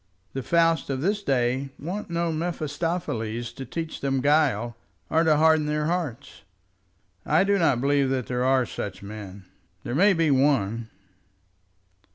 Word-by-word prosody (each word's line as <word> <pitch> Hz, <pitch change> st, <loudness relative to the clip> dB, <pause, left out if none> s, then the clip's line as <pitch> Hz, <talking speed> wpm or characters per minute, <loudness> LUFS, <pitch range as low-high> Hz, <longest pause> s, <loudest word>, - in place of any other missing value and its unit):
The 135 Hz, -, -3 dB
Fausts 165 Hz, +1 st, +2 dB
of 135 Hz, -1 st, -2 dB
this 205 Hz, +5 st, 0 dB
day 130 Hz, -3 st, 0 dB
want 180 Hz, +7 st, -5 dB
no 170 Hz, 0 st, -1 dB
Mephistopheles 155 Hz, -8 st, -3 dB
to 135 Hz, -, -7 dB
teach 165 Hz, +4 st, -5 dB
them 135 Hz, -1 st, 0 dB
guile 130 Hz, -5 st, +2 dB, 0.4 s
or 160 Hz, -, +3 dB
to 155 Hz, -2 st, +4 dB
harden 160 Hz, -1 st, +4 dB
their 150 Hz, 0 st, 0 dB
hearts." 150 Hz, -6 st, -3 dB, 0.8 s
"I 155 Hz, +5 st, +3 dB
do 200 Hz, 0 st, +2 dB
not 145 Hz, -8 st, +3 dB
believe 140 Hz, 0 st, +2 dB
that 130 Hz, -2 st, -1 dB
there 125 Hz, +2 st, -2 dB
are 130 Hz, -1 st, +3 dB
such 100 Hz, -3 st, -6 dB
men. 100 Hz, -2 st, -9 dB, 0.4 s
There -, -, -4 dB
may 195 Hz, +8 st, +5 dB
be 165 Hz, -4 st, +2 dB
one." 115 Hz, -5 st, +1 dB
145 Hz, 150 wpm, -25 LUFS, 125-165 Hz, 0.8 s, may